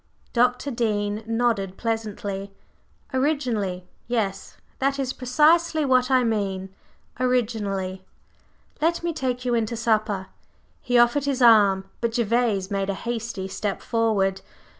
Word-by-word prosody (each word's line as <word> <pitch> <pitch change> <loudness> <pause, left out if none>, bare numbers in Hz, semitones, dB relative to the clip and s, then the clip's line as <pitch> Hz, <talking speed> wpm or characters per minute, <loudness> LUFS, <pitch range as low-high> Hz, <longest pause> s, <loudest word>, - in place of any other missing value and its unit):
Dr. 250 +3 +2
Dean 210 -3 -1
nodded 225 -5 0
pleasantly. 205 -3 -3 0.6
"Originally, 240 - -1 0.2
yes. 220 -5 -2 0.2
That 275 +1 +1
is 265 -2 -2
precisely 310 +5 +3
what 255 -1 +3
I 260 -1 +4
mean 195 -4 -2 0.5
originally! 210 -7 -1 0.8
Let 335 +2 +1
me 340 -1 -1
take 250 -3 -2
you 245 - +1
in 230 -2 +1
to 235 - -4
supper." 215 -4 0 0.6
He 245 -1 +1
offered 240 +4 +4
his 270 -3 0
arm, 200 -4 +5
but 230 -1 -1
Gervase 225 -4 +1
made 195 0 -1
a 195 - -1
hasty 225 -3 -4
step 200 +1 -3
forward. 205 -5 0
230 Hz, 125 wpm, -24 LUFS, 200-250 Hz, 0.8 s, arm